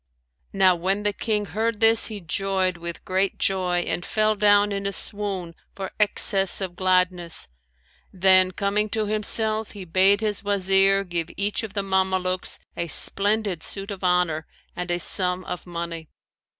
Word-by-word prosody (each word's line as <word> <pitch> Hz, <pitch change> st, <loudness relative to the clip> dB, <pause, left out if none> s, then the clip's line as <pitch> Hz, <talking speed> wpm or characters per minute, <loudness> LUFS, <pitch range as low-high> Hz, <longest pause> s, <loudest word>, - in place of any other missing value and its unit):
Now 190 Hz, -2 st, +3 dB
when 190 Hz, +4 st, -2 dB
the 205 Hz, 0 st, 0 dB
King 210 Hz, 0 st, -2 dB
heard 220 Hz, +1 st, -3 dB
this, 225 Hz, 0 st, +4 dB
he 215 Hz, -2 st, -6 dB
joyed 190 Hz, +2 st, -1 dB
with 170 Hz, 0 st, -8 dB
great 190 Hz, +1 st, -1 dB
joy 180 Hz, -2 st, 0 dB
and 175 Hz, -, -3 dB
fell 215 Hz, +2 st, 0 dB
down 205 Hz, 0 st, +3 dB
in 200 Hz, 0 st, -3 dB
a -, -, -2 dB
swoon 195 Hz, -4 st, -2 dB, 0.2 s
for 195 Hz, -1 st, -6 dB
excess 195 Hz, -2 st, +3 dB
of 185 Hz, -3 st, -5 dB
gladness; 180 Hz, -2 st, 0 dB, 0.6 s
then, 185 Hz, 0 st, +4 dB
coming 200 Hz, +3 st, -1 dB
to 215 Hz, 0 st, -1 dB
himself, 215 Hz, +1 st, -1 dB
he 200 Hz, -3 st, -9 dB
bade 190 Hz, +4 st, +3 dB
his 210 Hz, -2 st, -3 dB
Wazir 195 Hz, 0 st, +3 dB
give 170 Hz, -3 st, -4 dB
each 200 Hz, +1 st, -1 dB
of 220 Hz, -3 st, -8 dB
the 200 Hz, -, -1 dB
Mamelukes 190 Hz, -1 st, 0 dB, 0.2 s
a 170 Hz, -, -3 dB
splendid 200 Hz, +1 st, +2 dB
suit 195 Hz, +4 st, -5 dB
of 195 Hz, -1 st, -8 dB
honour 180 Hz, -4 st, 0 dB, 0.3 s
and 180 Hz, 0 st, -5 dB
a 175 Hz, 0 st, 0 dB
sum 180 Hz, 0 st, +3 dB
of 180 Hz, -, -7 dB
money. 170 Hz, -2 st, -6 dB
195 Hz, 160 wpm, -23 LUFS, 180-205 Hz, 0.6 s, this